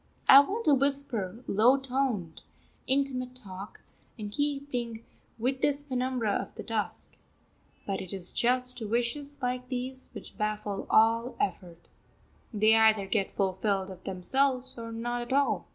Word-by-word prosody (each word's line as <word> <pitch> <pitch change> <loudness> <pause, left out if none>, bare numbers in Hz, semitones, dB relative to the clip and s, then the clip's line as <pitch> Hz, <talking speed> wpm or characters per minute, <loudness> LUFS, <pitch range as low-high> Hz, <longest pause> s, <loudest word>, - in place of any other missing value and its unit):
I 270 - +11
want 415 +11 0
to 295 - +7
whisper 260 -6 +1
low 235 +7 +4
toned, 255 -10 -2 0.5
intimate 260 -2 0
talk, 195 -4 -8 0.4
in 210 -2 -6
keeping 265 -4 -3 0.3
with 260 +3 -1
this 285 0 +1
penumbra 255 -5 -1
of - - -4
the - - -7
dusk. 225 -2 -4 0.7
But 195 -1 -2
it 185 - -6
is 185 -2 -1
just 250 0 +2
wishes 245 +6 -2
like 250 0 -2
these 260 +1 -3
which - - -11
baffle 210 -1 -3
all 230 +3 +3
effort. 175 - -4 0.6
They 215 0 +4
either 220 -2 +4
get 195 0 -1
fulfilled 195 0 -1
of 185 -1 -12
themselves, 260 +8 0
or 230 -1 -7
not 240 +2 -3
at 240 +2 -4
all. 280 0 +1
240 Hz, 140 wpm, -29 LUFS, 210-265 Hz, 0.7 s, I